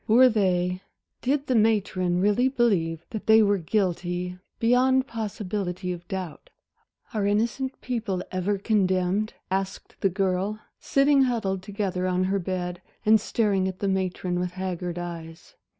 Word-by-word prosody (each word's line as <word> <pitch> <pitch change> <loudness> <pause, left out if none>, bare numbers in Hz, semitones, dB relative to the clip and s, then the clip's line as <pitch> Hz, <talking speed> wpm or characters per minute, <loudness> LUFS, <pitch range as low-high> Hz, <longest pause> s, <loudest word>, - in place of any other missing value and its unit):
Were 250 +4 +7
they 185 -4 +1 0.4
did 275 +2 0
the 260 - 0
matron 200 -5 +2
really 210 +6 +3
believe 190 - +1
that 220 - -6
they 220 0 +7
were 205 -1 +2
guilty, 180 -1 -1 0.2
beyond 255 +3 +3
possibility 200 -6 -3
of 175 0 -10
doubt? 185 -5 -6 0.6
"Are 205 -2 0
innocent 230 +6 0
people 220 -7 -2
ever 185 +2 0
condemned," 195 0 +1 0.2
asked 195 0 -3
the 195 - +3
girl, 195 +2 -1 0.2
sitting 275 0 +4
huddled 200 -7 -1
together 190 -2 -2
on 185 0 +1
her 195 +1 +1
bed 180 -1 -3 0.2
and 215 0 +6
staring 200 -4 +1
at 185 -1 -4
the 200 - -2
matron 185 -2 -1
with 180 0 -2
haggard 180 -2 -4
eyes. 170 -1 -7
195 Hz, 140 wpm, -26 LUFS, 180-220 Hz, 0.6 s, Were